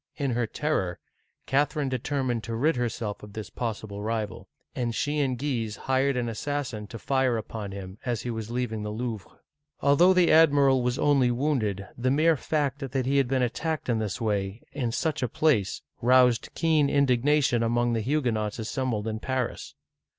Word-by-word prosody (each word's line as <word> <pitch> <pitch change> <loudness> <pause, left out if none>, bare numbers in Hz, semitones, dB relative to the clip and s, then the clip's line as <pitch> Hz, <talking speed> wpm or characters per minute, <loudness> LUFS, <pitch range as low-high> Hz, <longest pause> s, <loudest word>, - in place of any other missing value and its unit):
In 140 -3 -1
her 120 -1 0
terror, 105 - -1 0.5
Catherine 145 +1 +1
determined 130 -2 -1
to 115 - -4
rid 150 +7 +2
her 120 -1 0
self 105 -2 -5
of 105 -1 -11
this 110 -1 -7
possible 110 -3 -4
rival, 110 -1 -3 0.2
and 120 -2 -2
she 145 +1 0
and 130 -3 0
Guise 120 -6 -2
hired 135 +2 +1
an 120 -1 -1
assassin 120 -2 -3
to 115 - -8
fire 130 -1 +1
upon 105 -2 -6
him 95 +1 -8
as 120 -4 -2
he 120 - -3
was 110 -1 -5
leaving 120 -3 -2
the 105 - -4
Louvre. 110 -2 -4 0.5
Although 170 +7 +5
the 180 -2 +4
admiral 140 -5 +5
was 125 +1 0
only 140 -5 +3
wounded, 120 -7 -1
the 125 +1 0
mere 155 +4 +4
fact 145 -1 -1
that 135 -2 -2
he 140 +2 +2
had 135 -2 +3
been 130 0 +1
attacked 155 +5 -2
in 115 -2 +2
this 110 +2 -3
way, 105 -2 -2
in 125 -5 -2
such 155 +5 -1
a 125 - 0
place, 120 -11 +1 0.2
roused 125 -1 +4
keen 155 -4 +3
indignation 140 -1 +3
among 120 +1 +1
the 115 - 0
Huguenots 115 -5 0
assembled 115 -1 -2
in 110 0 -3
Paris. 130 0 -3
125 Hz, 180 wpm, -27 LUFS, 110-140 Hz, 0.5 s, Although